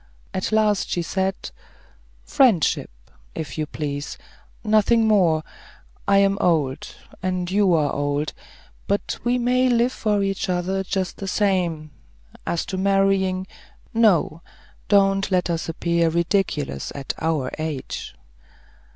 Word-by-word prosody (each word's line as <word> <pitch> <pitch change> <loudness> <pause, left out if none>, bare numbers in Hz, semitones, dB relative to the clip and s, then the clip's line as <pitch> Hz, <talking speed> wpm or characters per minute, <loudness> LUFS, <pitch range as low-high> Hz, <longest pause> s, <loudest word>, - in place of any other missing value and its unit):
At 185 - -2
last 215 -2 +2
she 175 - -1
said, 190 +3 -1 0.9
"Friendship, 250 - +3 0.5
if 150 -4 -5
you 155 -1 -2
please; 145 -1 -4 0.5
nothing 220 +1 +3
more. 175 -7 +3 0.6
I 200 0 +5
am 200 0 +3
old, 150 -7 +1 0.3
and 185 -1 -2
you 195 -3 +3
are 150 -3 +1
old, 145 +1 -1 0.5
but 200 +1 -1
we 240 +1 +2
may 250 +1 +2
live 240 +1 +3
for 210 -5 0
each 195 0 -2
other 185 +2 -1
just 190 -1 -3
the 195 - -6
same; 180 -6 0 0.6
as 170 - -1
to 190 - -4
marrying 195 -1 +2 0.5
no; 195 -8 +3 0.5
don't 195 -1 +3
let 180 -2 +1
us 165 -1 -3
appear 170 0 +1
ridiculous 170 - -1
at 140 -1 -4
our 160 -5 -1
age." 155 - -5
185 Hz, 125 wpm, -23 LUFS, 160-200 Hz, 0.9 s, I